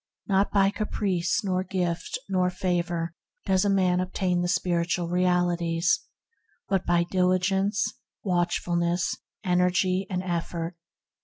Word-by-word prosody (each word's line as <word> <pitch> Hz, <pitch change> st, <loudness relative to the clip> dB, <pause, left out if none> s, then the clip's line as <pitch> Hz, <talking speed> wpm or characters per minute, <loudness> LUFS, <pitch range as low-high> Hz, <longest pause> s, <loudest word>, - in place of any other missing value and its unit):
Not 195 Hz, 0 st, +2 dB
by 195 Hz, -1 st, +4 dB
caprice, 195 Hz, -4 st, -1 dB
nor 185 Hz, -2 st, 0 dB
gift, 180 Hz, -2 st, -2 dB
nor 185 Hz, -2 st, +2 dB
favor 175 Hz, -2 st, -1 dB, 0.3 s
does 190 Hz, -1 st, +3 dB
a -, -, +3 dB
man 185 Hz, -2 st, +3 dB
obtain 180 Hz, -1 st, 0 dB
the 175 Hz, -, 0 dB
spiritual 175 Hz, -1 st, 0 dB
realities, 175 Hz, -1 st, +2 dB, 0.7 s
but 195 Hz, -2 st, 0 dB
by 175 Hz, 0 st, +3 dB
diligence, 185 Hz, +3 st, +1 dB, 0.4 s
watchfulness, 175 Hz, -1 st, 0 dB, 0.3 s
energy, 185 Hz, +1 st, +2 dB
and 185 Hz, -1 st, -2 dB
effort. 170 Hz, -1 st, -3 dB
180 Hz, 110 wpm, -26 LUFS, 175-190 Hz, 0.7 s, by